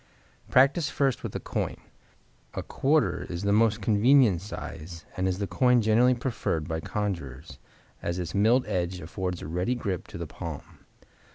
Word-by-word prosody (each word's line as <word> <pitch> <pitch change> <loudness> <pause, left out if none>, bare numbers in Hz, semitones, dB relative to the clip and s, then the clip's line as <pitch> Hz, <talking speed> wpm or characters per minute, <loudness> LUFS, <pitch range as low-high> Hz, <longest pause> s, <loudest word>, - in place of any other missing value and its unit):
Practice 140 +4 +4
first 135 -3 0
with - - -6
a - - -1
coin. - - -3 0.8
A - - -3
quarter 135 - +1
is 85 +1 -4
the 100 0 +2
most 110 0 +3
convenient 110 -3 +4
size 85 -4 -8
and 95 0 0
is 90 -1 0
the 100 - -1
coin 125 +7 +3
generally 115 +3 +4
preferred 110 - -2
by 80 -1 -2
conjurers, 80 -9 -4 0.4
as 85 +1 -2
its 90 -3 -4
milled 115 +6 +3
edge 90 0 -2
affords 90 +2 -4
a - - -5
ready 90 +10 -1
grip 100 -7 -3
to - - -8
the - - -4
palm. 80 -4 -8
100 Hz, 165 wpm, -27 LUFS, 85-120 Hz, 0.8 s, Practice